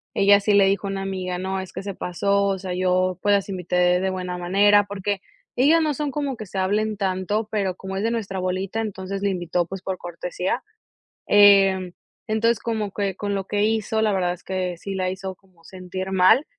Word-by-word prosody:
ella 200 0 +6
sí 205 +1 +1
le 200 -1 +6
dijo 200 +1 +1
a - - -3
una 195 0 -3
amiga: 185 -2 -3
"No, 190 +1 -3
es 190 - -7
que - - -6
se 200 -1 -4
pasó. 200 +3 0
O 195 -1 0
sea, 185 -1 -4
yo 185 0 +1
pues 205 - +3
las 200 0 +1
invité 180 -2 -3 0.3
de 190 - 0
buena 180 -1 -4
manera". 200 +3 +4
Porque, 200 0 -3 0.3
ellas 310 +6 +4
no 305 -2 +1
son 295 0 -2
como 280 -1 -2
que 215 -3 -8
se 195 - -7
hablen 210 +3 0
tanto, 195 +2 -1
pero 195 -4 -1
como 190 +1 -7
es 195 - -2
de 225 - +1
nuestra 205 -5 -3
bolita, 185 +4 -2
entonces 195 -2 -5
la 200 - +1
invitó, 175 -1 -1
pues 190 0 -7
por 190 -1 -3
cortesía. 180 +6 -3 0.6
Em, 195 -3 +5 0.3
entonces 225 +2 +1
como 220 -4 -2
que, 195 -2 -2
con 205 0 -3
lo 195 -1 -2
que 205 +1 0
hizo, 220 0 0
la 215 -1 +2
verdad 180 -2 0
es 180 - -13
que 185 -1 -2
sí 195 +3 -6
la 185 -1 -1
hizo 190 0 -5
como 185 -3 -28
sentir 185 +1 -6
mal. 190 +9 +5
195 Hz, 215 wpm, -23 LUFS, 185-205 Hz, 0.6 s, ella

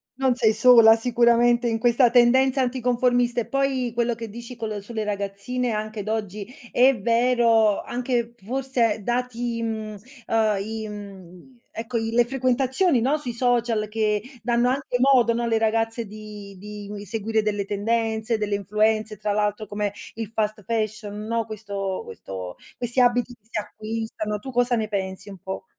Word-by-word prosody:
non 265 -1 +2
sei 220 -3 +3
sola 225 -1 +7
sicuramente 240 +1 +3
in 225 - 0
questa 240 +1 +4
tendenza 260 +2 +4
anticonformista. 245 -1 +1
E 220 - -5
poi 265 -1 0
quello 235 0 0
che 230 0 -6
dici 235 +3 -9
col 215 -3 -4
sulle 220 +1 -4
ragazzine 205 +5 -3
anche 215 0 -3
d'oggi 215 0 -4 0.2
è 255 0 +4
vero, 230 -1 +3
anche 240 -1 -2
forse 240 -2 0
dati, 240 -1 -2
mhmm, 220 -2 -4 0.3
uhm, 220 -2 +2
i, 220 +1 -4
mhmm, 200 +2 -11 0.2
ecco 230 +2 -3
i 225 0 -1
le 235 +1 +3
frequentazioni, 260 +3 +1
no, 280 +5 +2
sui 250 -5 -5
social 235 -3 +1
che 210 -1 0 0.2
danno 240 +1 +2
anche 260 -1 -1
modo, 250 -3 +5
no, 235 +1 -1
alle 225 -1 +1
ragazze 225 +1 0
di 210 -1 -10
di 205 +1 -8
seguire 220 +2 -1
delle 205 -2 -1
tendenze, 220 +2 -1
delle 210 -1 0
influenze, 215 +2 0
tra 210 +1 -2
l'altro 210 +1 -1
come 205 0 -2 0.2
il 225 -2 -5
fast 215 -1 -1
fashion, 215 -1 -2
no, 230 -1 0
questo 200 -3 -4
questo 95 -1 -8 0.2
questi 240 +1 -1
abiti 245 0 +2
che 220 -2 -43
si 220 - -3
acquistano. 215 0 -4
Tu 265 - -8
cosa 245 0 +2
ne 220 -2 -1
pensi 190 -1 -4
un 195 - -9
po'? 190 +2 -6
225 Hz, 160 wpm, -24 LUFS, 210-240 Hz, 0.3 s, sola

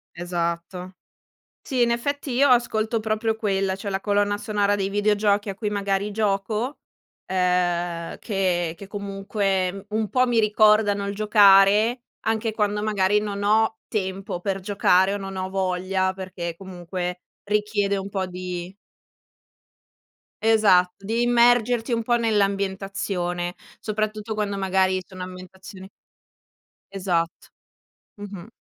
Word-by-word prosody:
Esatto. 175 +1 -4 0.7
Sì, 255 -2 -2
in 235 0 +3
effetti 285 +4 -2
io 265 +4 +4
ascolto 230 -2 +2
proprio 220 +1 -1
quella, 195 -3 0
cioè 200 +1 -6
la 190 -1 -1
colonna 205 0 +1
sonora 205 -1 0
dei 195 -1 -1
videogiochi 205 0 +1
a 195 - -4
cui 210 +1 -3
magari 200 0 -1
gioco, 210 +5 -1 0.5
ehm, 175 -2 0
che 180 -5 -1
che 200 - -10
comunque 195 -1 -2
un 215 0 -1
po' 255 0 +3
mi 240 -2 +2
ricordano 210 -1 +3
il 200 - -4
giocare, 210 +3 +5 0.2
anche 220 0 -1
quando 210 -1 0
magari 205 -1 +2
non 205 -1 -4
ho 220 +2 +2
tempo 195 -2 -3
per 195 +1 -2
giocare 190 -1 +3
o - - -1
non 195 -1 -7
ho 185 0 -3
voglia, 185 0 -1
perché 185 -3 -6
comunque 180 -1 -5 0.2
richiede 205 -1 0
un 195 0 -5
po' 195 -1 -2
di 180 0 -6 1.7
Esatto. 200 -4 +3
Devi 230 +3 0
immergerti 240 0 +3
un 230 -1 +1
po' 240 +1 +1
nell'ambientazione, 195 -4 -1 0.2
soprattutto 215 0 -3
quando 205 -2 -2
magari 190 -1 +1
sono 185 0 -9
ambientazioni 185 +1 -10 1.0
Esatto, 175 -4 -2 0.7
mh-mh. 200 -1 -8
200 Hz, 125 wpm, -24 LUFS, 185-215 Hz, 1.7 s, giocare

